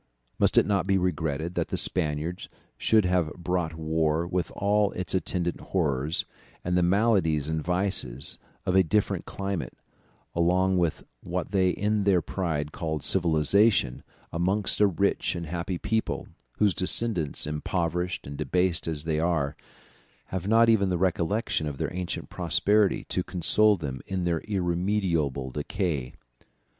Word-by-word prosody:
Must -, -, +3 dB
it -, -, +6 dB
not 100 Hz, -2 st, 0 dB
be 100 Hz, -1 st, +3 dB
regretted 85 Hz, -3 st, -1 dB
that -, -, -1 dB
the -, -, -2 dB
Spaniards 80 Hz, +1 st, -1 dB, 0.3 s
should 110 Hz, -3 st, +3 dB
have 90 Hz, -4 st, +1 dB
brought 85 Hz, -2 st, -2 dB
war 80 Hz, 0 st, 0 dB
with 90 Hz, -2 st, -1 dB
all 105 Hz, 0 st, +2 dB
its 90 Hz, -, -3 dB
attendant 90 Hz, -2 st, -1 dB
horrors, 75 Hz, -3 st, -1 dB, 0.4 s
and 90 Hz, 0 st, 0 dB
the 90 Hz, -, +3 dB
maladies 90 Hz, -6 st, +2 dB
and 80 Hz, -1 st, -2 dB
vices 90 Hz, -8 st, -1 dB, 0.3 s
of 90 Hz, -, +1 dB
a 95 Hz, -, +7 dB
different 100 Hz, +4 st, 0 dB
climate, 100 Hz, -3 st, -4 dB, 0.6 s
along 90 Hz, +2 st, +2 dB
with 85 Hz, -3 st, 0 dB, 0.2 s
what 90 Hz, +1 st, -4 dB
they 95 Hz, -2 st, +3 dB
in 105 Hz, +2 st, 0 dB
their 95 Hz, -2 st, +4 dB
pride 80 Hz, -6 st, -2 dB
called 80 Hz, -3 st, -3 dB
civilization, 90 Hz, -, +3 dB, 0.3 s
amongst 95 Hz, +5 st, 0 dB
a 105 Hz, -, +7 dB
rich 100 Hz, 0 st, 0 dB
and 85 Hz, -1 st, -4 dB
happy 85 Hz, +3 st, -3 dB
people, 110 Hz, +5 st, -2 dB, 0.3 s
whose 105 Hz, -3 st, +3 dB
descendants, 90 Hz, -1 st, +1 dB
impoverished 85 Hz, +3 st, -2 dB
and 70 Hz, 0 st, -7 dB
debased 85 Hz, +5 st, 0 dB
as 75 Hz, -3 st, -2 dB
they 80 Hz, -1 st, -1 dB
are, 80 Hz, -4 st, 0 dB, 0.8 s
have 95 Hz, 0 st, -2 dB
not 115 Hz, +2 st, +5 dB
even 105 Hz, -4 st, +4 dB
the 90 Hz, -, 0 dB
recollection 90 Hz, -1 st, 0 dB
of 70 Hz, -2 st, -5 dB
their -, -, -3 dB
ancient 90 Hz, -1 st, -4 dB
prosperity 105 Hz, -1 st, +2 dB
to 90 Hz, -, -2 dB
console 100 Hz, +4 st, +3 dB
them 70 Hz, -6 st, -5 dB
in 95 Hz, -2 st, -2 dB
their 85 Hz, -2 st, 0 dB
irremediable 85 Hz, -8 st, 0 dB
decay? 75 Hz, -3 st, -3 dB
90 Hz, 145 wpm, -27 LUFS, 80-95 Hz, 0.8 s, a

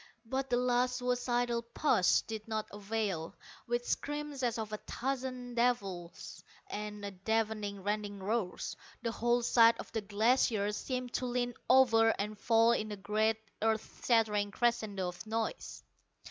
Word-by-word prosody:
But 265 Hz, +3 st, -2 dB
the 245 Hz, -, +2 dB
last 250 Hz, 0 st, +2 dB
suicidal 245 Hz, -1 st, 0 dB
push 235 Hz, -5 st, +3 dB
did 220 Hz, -1 st, -7 dB
not 220 Hz, -1 st, -2 dB
avail. 205 Hz, -5 st, -3 dB, 0.3 s
With 240 Hz, 0 st, -1 dB
screams 295 Hz, -1 st, -2 dB
as 240 Hz, -2 st, 0 dB
of 215 Hz, -1 st, -4 dB
a -, -, -1 dB
thousand 255 Hz, 0 st, -4 dB
devils 200 Hz, -8 st, -2 dB, 0.3 s
and 205 Hz, -2 st, -6 dB
deafening 215 Hz, -3 st, -1 dB
rending 205 Hz, 0 st, -2 dB
roars, 200 Hz, -1 st, -2 dB, 0.3 s
the 230 Hz, -, 0 dB
whole 240 Hz, +1 st, +1 dB
side 230 Hz, -1 st, +6 dB
of -, -, -8 dB
the 220 Hz, -, -2 dB
Glacier 210 Hz, 0 st, +2 dB
seemed 250 Hz, +3 st, -4 dB
to 255 Hz, -, -1 dB
lean 245 Hz, 0 st, -1 dB, 0.2 s
over 235 Hz, -3 st, +6 dB
and 210 Hz, +1 st, -3 dB
fall 225 Hz, +2 st, +4 dB
in 215 Hz, -2 st, 0 dB
a 205 Hz, -, -4 dB
great 215 Hz, +2 st, +1 dB, 0.2 s
earth 220 Hz, 0 st, -1 dB
shattering 215 Hz, -4 st, +3 dB
crescendo 220 Hz, -4 st, 0 dB
of 180 Hz, +5 st, -9 dB
noise. 225 Hz, -, -3 dB
225 Hz, 145 wpm, -33 LUFS, 210-245 Hz, 0.3 s, side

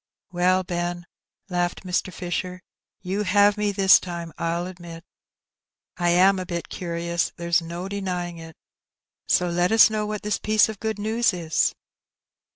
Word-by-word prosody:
''Well, 185 Hz, +1 st, +2 dB
Ben," 175 Hz, -1 st, -3 dB, 0.4 s
laughed 175 Hz, -1 st, -2 dB
Mr. 185 Hz, 0 st, -1 dB
Fisher, 180 Hz, 0 st, -4 dB, 0.4 s
"you 195 Hz, +2 st, -2 dB
have 205 Hz, +1 st, +4 dB
me 210 Hz, -1 st, 0 dB
this 195 Hz, -1 st, +6 dB
time, 170 Hz, -2 st, -7 dB
I'll 170 Hz, +1 st, -1 dB
admit. 175 Hz, -2 st, -10 dB, 0.9 s
I 175 Hz, -1 st, 0 dB
am 185 Hz, +2 st, +4 dB
a 185 Hz, -, -4 dB
bit 170 Hz, -1 st, -4 dB
curious, 170 Hz, -1 st, -2 dB
there's 170 Hz, 0 st, +1 dB
no 170 Hz, +3 st, -6 dB
denying 180 Hz, -4 st, -4 dB
it; 165 Hz, -1 st, -11 dB, 0.7 s
so 180 Hz, -, +2 dB
let 175 Hz, +2 st, +1 dB
us 220 Hz, 0 st, +7 dB
know 215 Hz, -1 st, -1 dB
what 210 Hz, -1 st, -4 dB
this 210 Hz, 0 st, -1 dB
piece 215 Hz, +1 st, +3 dB
of 215 Hz, -2 st, -7 dB
good 220 Hz, -1 st, -3 dB
news 220 Hz, +2 st, +1 dB
is.' 165 Hz, -3 st, 0 dB
180 Hz, 155 wpm, -24 LUFS, 175-200 Hz, 0.9 s, us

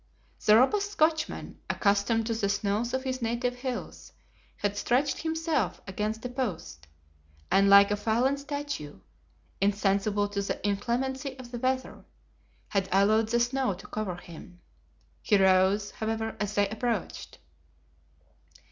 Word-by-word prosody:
The 210 Hz, -, +6 dB
robust 400 Hz, -, +3 dB
Scotchman, 315 Hz, -2 st, 0 dB
accustomed 205 Hz, +2 st, +1 dB
to 230 Hz, -, -1 dB
the 215 Hz, -3 st, -1 dB
snows 205 Hz, +4 st, 0 dB
of 260 Hz, 0 st, -2 dB
his 260 Hz, -1 st, -3 dB
native 240 Hz, +2 st, -1 dB
hills, 250 Hz, -1 st, -6 dB, 0.4 s
had 205 Hz, 0 st, -1 dB
stretched 265 Hz, +7 st, +1 dB
himself 320 Hz, -3 st, -1 dB
against 210 Hz, +4 st, -3 dB
a -, -, -2 dB
post, 165 Hz, -, -5 dB, 0.6 s
and 195 Hz, 0 st, +5 dB
like 200 Hz, 0 st, +8 dB
a -, -, +3 dB
fallen 230 Hz, +6 st, +1 dB
statue, 285 Hz, -, -5 dB, 0.6 s
insensible 205 Hz, +1 st, +1 dB
to 200 Hz, 0 st, -2 dB
the 200 Hz, -, -3 dB
inclemency 260 Hz, +6 st, -2 dB
of 250 Hz, -2 st, -11 dB
the 240 Hz, -, -5 dB
weather, 260 Hz, +1 st, -2 dB, 0.7 s
had 195 Hz, -2 st, 0 dB
allowed 215 Hz, +3 st, +4 dB
the 235 Hz, +1 st, +2 dB
snow 245 Hz, -3 st, 0 dB
to 185 Hz, -, -13 dB
cover 210 Hz, -4 st, -4 dB
him. 175 Hz, 0 st, -12 dB, 0.6 s
He 210 Hz, -, +3 dB
rose, 190 Hz, +2 st, +3 dB
however, 225 Hz, 0 st, -3 dB
as 210 Hz, 0 st, -2 dB
they 205 Hz, 0 st, +3 dB
approached. 220 Hz, -2 st, -3 dB
220 Hz, 135 wpm, -28 LUFS, 200-255 Hz, 0.7 s, like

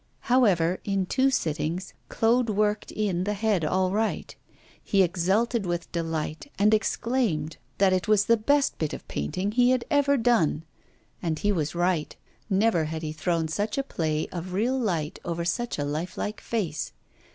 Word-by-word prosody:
However, 185 Hz, -9 st, +3 dB
in 195 Hz, -2 st, 0 dB
two 265 Hz, +7 st, +2 dB
sittings, 170 Hz, -, -2 dB, 0.2 s
Claude 235 Hz, +1 st, +2 dB
worked 210 Hz, 0 st, 0 dB
in 195 Hz, -4 st, -1 dB
the 205 Hz, +2 st, -1 dB
head 205 Hz, -4 st, +1 dB
all 185 Hz, +4 st, +1 dB
right. 215 Hz, +2 st, -1 dB, 0.5 s
He 195 Hz, -1 st, +3 dB
exulted 195 Hz, +5 st, +1 dB
with 175 Hz, 0 st, -3 dB
delight, 165 Hz, -, -3 dB
and 210 Hz, +2 st, +4 dB
exclaimed 215 Hz, -, 0 dB, 0.2 s
that 190 Hz, -1 st, +4 dB
it 185 Hz, +2 st, 0 dB
was 210 Hz, -1 st, +4 dB
the 230 Hz, -, +5 dB
best 280 Hz, +6 st, +1 dB
bit 155 Hz, -2 st, -1 dB
of -, -, -8 dB
painting 185 Hz, -, -2 dB
he 245 Hz, +2 st, +4 dB
had 255 Hz, -2 st, +1 dB
ever 280 Hz, -1 st, +3 dB
done; 225 Hz, -, +2 dB, 0.6 s
and 165 Hz, -3 st, -1 dB
he 205 Hz, +6 st, +1 dB
was 160 Hz, -4 st, -1 dB
right, 175 Hz, -3 st, 0 dB, 0.3 s
never 195 Hz, -4 st, +2 dB
had 160 Hz, +1 st, -5 dB
he 155 Hz, -, -3 dB
thrown 165 Hz, +1 st, -1 dB
such 205 Hz, -, -2 dB
a 275 Hz, -, +1 dB
play 155 Hz, -, -2 dB
of 180 Hz, +1 st, -5 dB
real 230 Hz, +7 st, +1 dB
light 175 Hz, -8 st, -2 dB
over 170 Hz, -1 st, -3 dB
such 240 Hz, +7 st, -1 dB
a 145 Hz, -, -1 dB
life 155 Hz, +5 st, -4 dB
like 210 Hz, -, -4 dB
face. 185 Hz, -10 st, -3 dB
190 Hz, 170 wpm, -26 LUFS, 165-225 Hz, 0.6 s, the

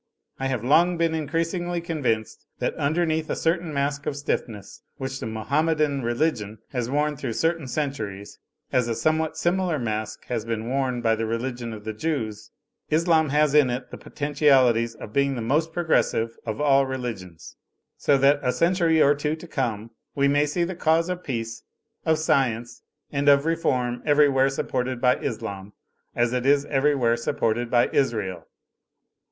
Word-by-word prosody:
I 135 Hz, -, -1 dB
have 130 Hz, -4 st, -2 dB
long 170 Hz, +7 st, +4 dB
been 165 Hz, -1 st, +1 dB
in 155 Hz, -2 st, -2 dB
creasingly 170 Hz, +3 st, -1 dB
convinced 135 Hz, -, -2 dB
that -, -, -1 dB
underneath 160 Hz, +1 st, 0 dB
a -, -, 0 dB
certain 165 Hz, 0 st, 0 dB
mask 140 Hz, 0 st, -2 dB
of 145 Hz, -, -2 dB
stiffness 115 Hz, -7 st, -4 dB, 0.2 s
which 135 Hz, 0 st, -4 dB
the -, -, -4 dB
Mahomedan 145 Hz, +5 st, 0 dB
religion 120 Hz, -4 st, -1 dB
has 125 Hz, -3 st, -2 dB
worn 150 Hz, +2 st, 0 dB
through 130 Hz, -4 st, -4 dB
certain 165 Hz, +1 st, 0 dB
centuries, 110 Hz, -9 st, -4 dB, 0.3 s
as 125 Hz, -2 st, +2 dB
a 115 Hz, -, -1 dB
somewhat 155 Hz, +2 st, 0 dB
similar 175 Hz, -2 st, +1 dB
mask 110 Hz, -3 st, -4 dB
has 120 Hz, -3 st, -3 dB
been 115 Hz, 0 st, -3 dB
worn 130 Hz, -1 st, -1 dB
by 115 Hz, -1 st, +2 dB
the 110 Hz, 0 st, -2 dB
religion 120 Hz, +1 st, -3 dB
of 110 Hz, -1 st, -8 dB
the 110 Hz, 0 st, -4 dB
Jews, 110 Hz, -5 st, -3 dB, 0.4 s
Islam 160 Hz, -1 st, +3 dB
has 150 Hz, 0 st, +2 dB
in 150 Hz, -4 st, +5 dB
it 125 Hz, +1 st, -4 dB
the -, -, -7 dB
potentialities 135 Hz, -6 st, +2 dB
of 105 Hz, -, -10 dB
being 140 Hz, +1 st, +2 dB
the 120 Hz, -, -4 dB
most 155 Hz, +7 st, +1 dB
progressive 155 Hz, -9 st, +1 dB
of 110 Hz, -1 st, -3 dB
all 140 Hz, -2 st, +4 dB
religions; 115 Hz, -10 st, -6 dB, 0.4 s
so 140 Hz, -, +2 dB
that 140 Hz, +2 st, +4 dB
a 125 Hz, -, +1 dB
century 170 Hz, 0 st, +2 dB
or 145 Hz, -1 st, +6 dB
two 150 Hz, +1 st, -2 dB
to 160 Hz, +2 st, -12 dB
come 115 Hz, -7 st, -3 dB, 0.2 s
we 140 Hz, 0 st, +3 dB
may 145 Hz, +1 st, +3 dB
see 170 Hz, +4 st, 0 dB
the 180 Hz, +2 st, -2 dB
cause 165 Hz, 0 st, +1 dB
of 180 Hz, 0 st, -4 dB
peace, 115 Hz, -3 st, -4 dB, 0.5 s
of 160 Hz, -1 st, +4 dB
science 120 Hz, -6 st, 0 dB, 0.3 s
and 145 Hz, 0 st, +2 dB
of 140 Hz, +1 st, +5 dB
reform 125 Hz, -7 st, 0 dB
every 145 Hz, -1 st, +4 dB
where 135 Hz, 0 st, +3 dB
supported 130 Hz, -2 st, -2 dB
by 125 Hz, 0 st, +3 dB
Islam 105 Hz, -5 st, -5 dB, 0.4 s
as 120 Hz, 0 st, +1 dB
it 125 Hz, +1 st, -1 dB
is 145 Hz, 0 st, +4 dB
everywhere 135 Hz, -4 st, +2 dB
sup 115 Hz, -, -3 dB
ported 115 Hz, +1 st, 0 dB
by 120 Hz, 0 st, +3 dB
Israel. 105 Hz, -10 st, -1 dB
135 Hz, 170 wpm, -24 LUFS, 115-155 Hz, 0.5 s, or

